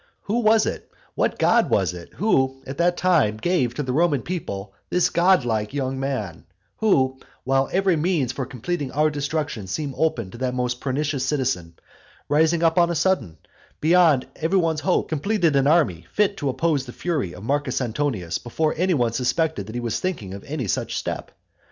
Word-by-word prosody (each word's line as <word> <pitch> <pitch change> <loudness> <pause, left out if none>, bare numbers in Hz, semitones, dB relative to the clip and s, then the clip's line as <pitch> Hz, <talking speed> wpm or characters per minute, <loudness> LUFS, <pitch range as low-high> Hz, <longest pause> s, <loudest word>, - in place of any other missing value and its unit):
Who 215 +4 0
was 220 -1 +4
it - - -4 0.2
what - - 0
god - - +3
was - - +2
it, 85 -1 -10
who 135 -10 +1
at 135 +3 -7
that 175 +1 +2
time 155 -13 +2
gave 130 -3 0
to 150 - -2
the 130 -2 -2
Roman 150 -4 +2
people 100 - -5 0.2
this 180 - +2
godlike 135 - +2
young 130 -1 -2
man, 105 - -4 0.3
who, 130 -12 +2 0.2
while 135 +1 +1
every 190 -1 +2
means 155 -5 0
for 130 -2 -4
completing 140 +3 -4
our 155 +2 +2
destruction 145 -7 -3
seemed 140 +8 -3
open 115 -12 0
to 120 - -10
that 130 -1 -1
most 125 0 -2
pernicious 140 0 -1
citizen, 130 - -1 0.5
rising 160 +3 +2
up 165 +1 +4
on 170 0 +4
a 170 - -1
sudden, 165 - 0 0.4
beyond 160 -4 +4
every 165 +5 +1
one's 165 -3 +1
hope, 185 +1 +1
completed 165 0 +1
an 135 0 +3
army 135 - +2
fit 210 -1 +2
to 145 -5 -1
oppose 150 +1 +1
to - - -11
the - - -19
fury 150 - -2
of 90 - -10
Marcus 140 +1 0
Antonius 115 - -2
before 155 +6 -1
any 180 +1 +2
one 120 -4 +1
suspected 130 - 0
that 110 - -8
he 120 - -2
was 115 -1 -2
thinking 115 - -3
of 100 - -8
any 140 -6 -3
such - - -2
step? - - -4
140 Hz, 190 wpm, -23 LUFS, 120-170 Hz, 0.5 s, was